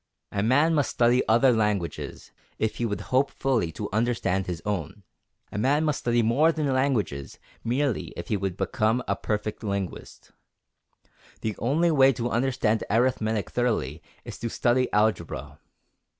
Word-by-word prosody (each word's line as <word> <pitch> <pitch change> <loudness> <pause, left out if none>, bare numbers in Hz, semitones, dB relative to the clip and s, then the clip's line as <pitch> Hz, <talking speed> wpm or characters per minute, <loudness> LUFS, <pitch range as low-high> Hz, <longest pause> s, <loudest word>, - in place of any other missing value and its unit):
A 100 - -1
man 145 +9 +3
must 145 -3 +2
study 120 +1 +3
other 120 +4 +5
languages, 105 -6 -2 0.3
if 110 - -1
he 120 - 0
would 105 - -3
hope 135 +2 +4
fully 120 -11 0
to 105 - -4
understand 105 -5 0
his 90 -3 -3
own. 100 0 -3 0.5
A 105 - -3
man 145 +7 +2
must 150 -2 0
study 120 -1 +1
more 140 +9 +4
than 150 -4 -1
languages 110 - -1 0.3
merely 130 +1 0
if 85 - -7
he 110 - +1
would 95 -2 -3
become 120 0 0
a - - +1
perfect 105 +1 -3
linguist. 100 -3 -5 1.1
The 110 -2 -2
only 160 +8 +2
way 135 -3 +5
to 120 0 -3
understand 115 -3 +1
arithmetic 110 -2 +1
thoroughly 105 - -1 0.2
is - - -8
to 115 - -3
study 125 +2 +1
algebra. 85 - -1
115 Hz, 150 wpm, -26 LUFS, 105-130 Hz, 1.1 s, other